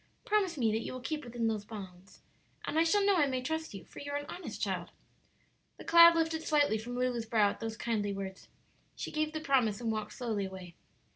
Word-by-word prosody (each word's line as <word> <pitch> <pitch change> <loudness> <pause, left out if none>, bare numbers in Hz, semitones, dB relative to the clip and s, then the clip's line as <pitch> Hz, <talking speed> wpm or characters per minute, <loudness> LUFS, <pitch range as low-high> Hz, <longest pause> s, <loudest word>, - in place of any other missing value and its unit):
"Promise 395 -6 +1
me 230 -4 +2
that 220 - +1
you 230 - -5
will 255 - -5
keep 300 +4 -4
within 240 -1 -3
those 215 -2 -1
bounds, 195 -3 -11 0.4
and 315 - 0
I - - +6
shall 395 +5 +3
know 400 -2 +4
I 295 -4 +4
may 260 -1 -1
trust 320 -1 -3
you; 195 - -9
for - - -12
you 285 - -6
are - - +1
an 290 - -5
honest 360 - -7
child." - - -2 0.9
The - - -11
cloud 335 0 +9
lifted 325 -1 +1
slightly 290 -9 +2
from 240 +3 -6
Lulu's 250 -2 -1
brow 210 -3 +3
at - - -10
those 225 -1 -4
kindly 215 -4 -1
words. 195 -1 -6 0.5
She - - -5
gave 310 0 0
the 315 - -3
promise, 255 -9 +2
and 230 -2 -1
walked 215 -1 -3
slowly 220 -6 -2
away. 185 -2 -8
245 Hz, 225 wpm, -32 LUFS, 215-310 Hz, 0.9 s, cloud